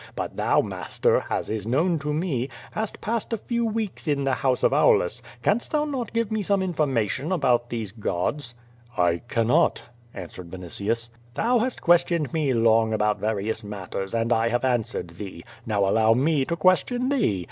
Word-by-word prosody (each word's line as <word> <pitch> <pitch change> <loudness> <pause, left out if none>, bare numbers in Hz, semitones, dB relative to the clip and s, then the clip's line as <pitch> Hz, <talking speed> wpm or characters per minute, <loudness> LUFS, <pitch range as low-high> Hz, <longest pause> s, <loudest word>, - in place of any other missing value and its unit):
But - - -4
thou, - - +3
master, - - 0
as - - -2
is 110 -1 -3
known 160 +7 +2
to 150 +1 -3
me, 150 -5 -1 0.2
hast 220 -1 -4
passed 230 +1 -2
a - - +1
few 235 +2 -2
weeks 220 -5 -3
in 145 -2 +1
the 135 -1 +1
house 130 -2 0
of - - +4
Aulus, 480 0 +3 0.2
canst 230 +9 0
not 300 0 +1
thou 260 -3 -1
give 230 0 -2
me 220 -1 0
some 200 0 +1
information 145 - 0
about 125 -8 +2
these 110 -4 -4
Godsr 120 +5 -2 0.4
"I 85 -1 +2
cannot," 115 0 +2 0.3
answered 90 -2 -8
Vinitius. 100 +6 -4 0.2
"Thou 245 +1 +2
hast 250 +2 -2
questioned 170 -5 +3
me 155 -4 +1
long 115 -2 +3
about 105 -1 +1
various 110 +1 -2
matters, 100 0 -5
and 115 +1 +2
I 115 +1 +2
have 120 +2 0
answered 115 -8 -1
thee. 95 -4 -7 0.2
Now 100 -3 +1
allow 110 +3 +4
me 140 +1 +2
to 170 - -1
question 245 +9 +2
thee. 230 - +1
130 Hz, 175 wpm, -25 LUFS, -, 0.4 s, of